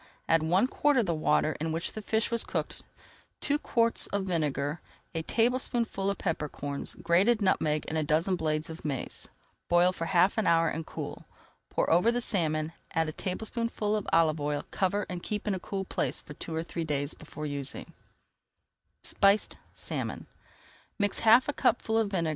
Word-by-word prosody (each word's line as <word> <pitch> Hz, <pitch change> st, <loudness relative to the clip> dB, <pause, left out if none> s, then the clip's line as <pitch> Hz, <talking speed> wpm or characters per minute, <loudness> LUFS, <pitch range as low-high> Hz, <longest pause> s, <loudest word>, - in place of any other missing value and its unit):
Add 165 Hz, -1 st, +4 dB
one 175 Hz, +7 st, +3 dB
quart 290 Hz, +2 st, +2 dB
of 235 Hz, -, +3 dB
the 170 Hz, -, 0 dB
water 155 Hz, 0 st, +1 dB
in 160 Hz, +1 st, -1 dB
which 165 Hz, +2 st, -3 dB
the 215 Hz, -, -5 dB
fish 220 Hz, +2 st, 0 dB
was 235 Hz, -1 st, +5 dB
cooked, -, -, -4 dB, 0.6 s
two 290 Hz, 0 st, 0 dB
quarts 230 Hz, -4 st, +2 dB
of 200 Hz, -1 st, -1 dB
vinegar, 150 Hz, -4 st, -1 dB, 0.3 s
a 165 Hz, -, -1 dB
tablespoonful 235 Hz, -1 st, 0 dB
of 200 Hz, -, -1 dB
pepper 160 Hz, -4 st, -2 dB
corns, 140 Hz, 0 st, -4 dB
grated 190 Hz, +7 st, +4 dB
nutmeg 155 Hz, -6 st, +1 dB
and 160 Hz, -, -1 dB
a -, -, 0 dB
dozen 160 Hz, +5 st, +2 dB
blades 155 Hz, -2 st, -1 dB
of 160 Hz, 0 st, -9 dB
mace. 140 Hz, -4 st, -4 dB, 0.4 s
Boil 175 Hz, +1 st, +5 dB
for 165 Hz, -2 st, -4 dB
half 180 Hz, +5 st, +3 dB
an 215 Hz, -, 0 dB
hour 165 Hz, 0 st, +4 dB
and 160 Hz, 0 st, -4 dB
cool. -, -, -6 dB, 0.4 s
Pour -, -, 0 dB
over 180 Hz, +8 st, +5 dB
the 240 Hz, -, 0 dB
salmon, 160 Hz, -8 st, +1 dB, 0.2 s
add 160 Hz, -1 st, +2 dB
a -, -, -6 dB
tablespoonful 215 Hz, +3 st, -2 dB
of 210 Hz, -, -3 dB
olive 160 Hz, -2 st, +3 dB
oil, 145 Hz, 0 st, -2 dB
cover, 200 Hz, +2 st, 0 dB
and 180 Hz, -1 st, -5 dB
keep 210 Hz, +2 st, -4 dB
in 205 Hz, -, +2 dB
a 190 Hz, -, -2 dB
cool 195 Hz, +1 st, -4 dB
place -, -, -2 dB
for 150 Hz, -, -10 dB
two 160 Hz, +2 st, -6 dB
or 160 Hz, -, -1 dB
three 170 Hz, 0 st, -4 dB
days 145 Hz, -2 st, -2 dB
before 150 Hz, -, -8 dB
using. 140 Hz, -2 st, -3 dB
170 Hz, 160 wpm, -29 LUFS, 155-205 Hz, 0.6 s, was